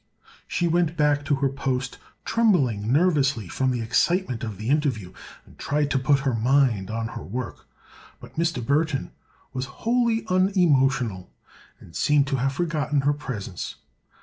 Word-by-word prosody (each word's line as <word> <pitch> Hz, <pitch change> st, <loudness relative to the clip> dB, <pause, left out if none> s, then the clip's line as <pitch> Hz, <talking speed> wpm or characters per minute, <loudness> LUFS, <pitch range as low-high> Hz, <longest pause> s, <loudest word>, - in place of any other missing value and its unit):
She 175 Hz, -, 0 dB
went 170 Hz, -1 st, +1 dB
back 145 Hz, -2 st, +2 dB
to 145 Hz, -, +2 dB
her 135 Hz, 0 st, +1 dB
post, 135 Hz, -1 st, -3 dB, 0.3 s
trembling 130 Hz, -, +2 dB
nervously 140 Hz, -, +2 dB
from 130 Hz, +9 st, 0 dB
the 125 Hz, -2 st, -1 dB
excitement 125 Hz, +3 st, +1 dB
of 110 Hz, -4 st, -4 dB
the 110 Hz, +3 st, -6 dB
interview, 130 Hz, -, 0 dB, 0.3 s
and -, -, -20 dB
tried 145 Hz, 0 st, 0 dB
to 135 Hz, -, +2 dB
put 140 Hz, +1 st, +2 dB
her 135 Hz, -2 st, 0 dB
mind 115 Hz, -4 st, +2 dB
on 115 Hz, +1 st, -3 dB
her -, -, -7 dB
work. 125 Hz, +5 st, -6 dB, 0.5 s
Mr. 165 Hz, -7 st, -2 dB
Burthon 145 Hz, +1 st, 0 dB, 0.4 s
was 130 Hz, 0 st, -2 dB, 0.2 s
wholly 235 Hz, -1 st, +2 dB
unemotional 135 Hz, -, +2 dB, 0.5 s
and 80 Hz, -, -15 dB
seemed 145 Hz, -1 st, +3 dB
to 135 Hz, -, 0 dB
have 135 Hz, +2 st, 0 dB
forgotten 150 Hz, -3 st, 0 dB
her 145 Hz, +2 st, +2 dB
presence. 125 Hz, -, -6 dB
140 Hz, 150 wpm, -24 LUFS, 125-155 Hz, 0.5 s, seemed